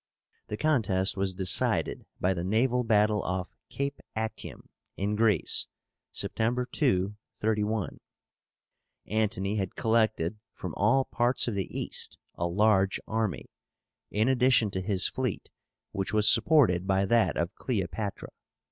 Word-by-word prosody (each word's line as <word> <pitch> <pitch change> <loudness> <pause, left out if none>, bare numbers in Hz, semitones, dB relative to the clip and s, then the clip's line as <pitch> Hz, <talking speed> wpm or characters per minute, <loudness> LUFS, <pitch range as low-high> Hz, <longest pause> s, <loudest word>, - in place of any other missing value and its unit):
The 105 - -5
contest 105 -11 +1
was 95 -2 -1
decided 90 -1 +1
by 95 +1 +1
the 85 -2 -4
naval 120 +6 +1
battle 105 -2 +2
off 95 -1 -3 0.2
Cape 140 +1 -3 0.2
Actium, 110 0 -5 0.3
in 100 +2 -1
Greece, 105 -5 +2 0.4
September 120 +3 -1
2, 105 - 0 0.2
31. 105 -1 -1 1.1
Antony 105 -1 -1
had 95 -3 -3
collected 110 -4 +1 0.2
from 90 -4 -6
all 130 +7 +3
parts 120 +1 +1
of 120 - -1
the 95 -2 -3
East - - -4 0.2
a 85 - -2
large 95 +1 +2
army, 110 - -2 0.6
in 110 +3 +1
addition 125 -4 +3
to 95 - -3
his 95 -1 +2
fleet, 125 -7 -4 0.4
which 95 +1 -3
was 105 0 +4
supported 105 - +5
by 95 0 +2
that 115 +3 +2
of 85 +4 -1
Cleopátra. 100 -3 -4
105 Hz, 130 wpm, -28 LUFS, 95-115 Hz, 1.1 s, supported